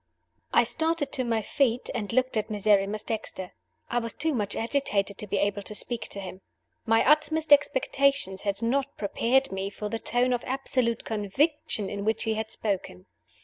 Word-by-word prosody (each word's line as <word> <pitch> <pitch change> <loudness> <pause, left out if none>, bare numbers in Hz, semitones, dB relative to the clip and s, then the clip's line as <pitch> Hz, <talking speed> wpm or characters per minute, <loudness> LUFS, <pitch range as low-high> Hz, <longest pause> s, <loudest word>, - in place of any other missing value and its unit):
I - - +5
STARTED 320 -3 0
to 260 - -1
my 225 -2 0
feet, 250 +1 +1
and 205 -2 -3
looked 255 +1 +1
at 215 0 -1
Miserrimus 205 0 +2
Dexter. 200 -4 -4 0.3
I 240 - 0
was 230 -1 -3
too 320 +1 +1
much 205 -5 -2
agitated 210 -5 0
to 210 - -3
be 205 - -1
able 200 +1 0
to 210 +2 -3
speak 235 +2 -2
to 200 - -5
him. 190 -1 -8 0.5
My 225 +2 +4
utmost 305 +1 +4
expectations 275 -7 +2
had 200 +2 -2
not 275 +4 0
prepared 245 +6 +1
me 195 0 -3
for 210 +1 -5
the 225 - -3
tone 250 +2 +1
of 245 - -1
absolute 255 -3 -1
conviction 220 - 0
in 200 +1 -4
which 220 +1 0
he 225 - 0
had 220 0 -3
spoken. 190 - -3
225 Hz, 180 wpm, -27 LUFS, 205-265 Hz, 0.5 s, I